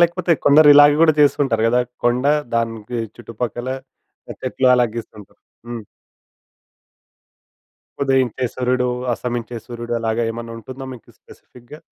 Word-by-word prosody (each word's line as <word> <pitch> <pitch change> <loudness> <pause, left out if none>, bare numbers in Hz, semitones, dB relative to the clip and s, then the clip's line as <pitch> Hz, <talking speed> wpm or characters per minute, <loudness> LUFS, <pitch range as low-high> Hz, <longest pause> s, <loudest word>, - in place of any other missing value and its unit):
లేకపోతే 170 0 +2
కొందరిలాగ 145 0 +7
గూడా 165 -1 +6
చేస్తూంటారు 135 -6 +2
గదా! 125 +1 +2 0.2
కొండ 120 +2 +1 0.3
దానికి 115 0 -2 0.2
చుట్టుపక్కల 120 +1 -5 0.6
ఆహ్, - - -9
చెట్లు 130 -1 +1
అలాగ 120 -2 +2
గీస్తుంటారు. 110 -3 -10 0.3
హ్మ్. 120 -2 -6 2.2
ఉదయించే 130 -2 +1
సూర్యుడు, 125 0 0 0.3
అస్తమించే 120 0 -4
సూర్యుడు 120 0 -6
అలాగా 115 +1 -1
ఏమన్నుంటుందా 115 +3 -8
మీకు 120 - -15
స్పెసిఫిక్‌గా? 125 +5 -16
120 Hz, 105 wpm, -20 LUFS, 115-135 Hz, 2.2 s, కొందరిలాగ